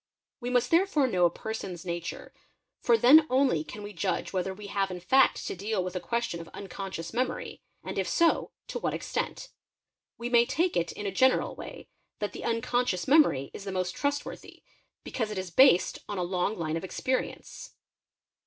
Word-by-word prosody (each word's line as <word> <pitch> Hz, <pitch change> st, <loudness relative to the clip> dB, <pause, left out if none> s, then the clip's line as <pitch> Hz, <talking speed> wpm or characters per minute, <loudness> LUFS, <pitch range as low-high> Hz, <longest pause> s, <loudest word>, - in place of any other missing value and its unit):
We 245 Hz, -1 st, -4 dB
must 245 Hz, -1 st, +1 dB
therefore 335 Hz, -4 st, +3 dB
know 185 Hz, -8 st, +2 dB
a -, -, +5 dB
person's 190 Hz, -2 st, -6 dB
nature, 170 Hz, 0 st, -5 dB, 0.5 s
for 235 Hz, -2 st, +4 dB
then 295 Hz, +7 st, +7 dB
only 255 Hz, -, +2 dB
can 210 Hz, +5 st, -9 dB
we 205 Hz, 0 st, -7 dB
judge 185 Hz, +1 st, -2 dB
whether 190 Hz, 0 st, -1 dB
we 205 Hz, +2 st, -9 dB
have 195 Hz, -1 st, -1 dB
in 180 Hz, -1 st, -5 dB
fact 260 Hz, +10 st, +3 dB
to -, -, -3 dB
deal 200 Hz, +1 st, -2 dB
with 180 Hz, 0 st, -5 dB
a -, -, 0 dB
question 230 Hz, 0 st, -2 dB
of 165 Hz, -, -11 dB
un 200 Hz, -, -7 dB
conscious 190 Hz, -3 st, -6 dB
memory, 435 Hz, -, -2 dB, 0.2 s
and -, -, -4 dB
if -, -, -1 dB
so, 335 Hz, -1 st, +2 dB, 0.2 s
to -, -, -3 dB
what -, -, -1 dB
extent. -, -, -4 dB, 0.7 s
We 235 Hz, -, -4 dB
may 240 Hz, -1 st, +4 dB
take 345 Hz, +3 st, 0 dB
it, 170 Hz, 0 st, 0 dB
in 205 Hz, -, -7 dB
a 200 Hz, -, -1 dB
general 260 Hz, +7 st, +3 dB
way, -, -, -9 dB, 0.3 s
that 205 Hz, -, -3 dB
the -, -, -7 dB
unconscious 230 Hz, -4 st, 0 dB
memory 270 Hz, -, +4 dB
is -, -, -8 dB
the 195 Hz, -, -5 dB
most 185 Hz, -1 st, -2 dB
trustworthy. 285 Hz, 0 st, -4 dB, 0.4 s
because 225 Hz, -4 st, -3 dB
it 210 Hz, -, -5 dB
is 185 Hz, -2 st, -4 dB
based 220 Hz, -2 st, +5 dB
on 205 Hz, -, -3 dB
a 180 Hz, -, 0 dB
long 180 Hz, +4 st, -1 dB
line 160 Hz, -1 st, -2 dB
of 165 Hz, -, -6 dB
experience. 260 Hz, -, -4 dB
210 Hz, 190 wpm, -28 LUFS, 180-255 Hz, 0.7 s, then